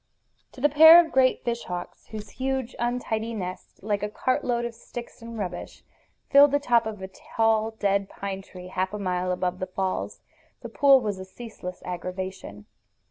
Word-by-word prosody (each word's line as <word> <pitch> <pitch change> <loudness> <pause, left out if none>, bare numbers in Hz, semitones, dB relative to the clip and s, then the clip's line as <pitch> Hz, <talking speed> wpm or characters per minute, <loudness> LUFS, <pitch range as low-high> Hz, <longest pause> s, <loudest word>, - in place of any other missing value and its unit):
To 255 - -11
the 295 - +6
pair 320 +3 +9
of 335 -2 +2
great 260 -1 +3
fish 235 -1 -2
hawks, 180 -1 -7
whose 215 -1 -8
huge, 265 -2 -3
untidy 230 -2 -2
nest, 185 -2 -7
like 205 -1 -1
a 210 - -2
cart 255 +4 -1
load 240 -1 0
of 235 - -4
sticks 235 +1 -10
and 230 0 -8
rubbish, 180 -4 -6 0.5
filled 280 0 +7
the 285 - +4
top 240 -5 +2
of 210 -3 -6
a - - -4
tall 220 +3 0
dead 200 -1 +1
pine 195 -1 -5
tree 180 -1 -11
half 185 +1 -2
a - - -3
mile 185 -2 -1
above 180 0 -2
the 185 - -3
falls, 190 0 -3 0.4
the - - -7
pool 275 -2 +5
was 205 -4 -3
a - - -6
ceaseless 190 -3 -9
aggravation. 180 - -6
215 Hz, 185 wpm, -26 LUFS, 185-240 Hz, 0.5 s, pair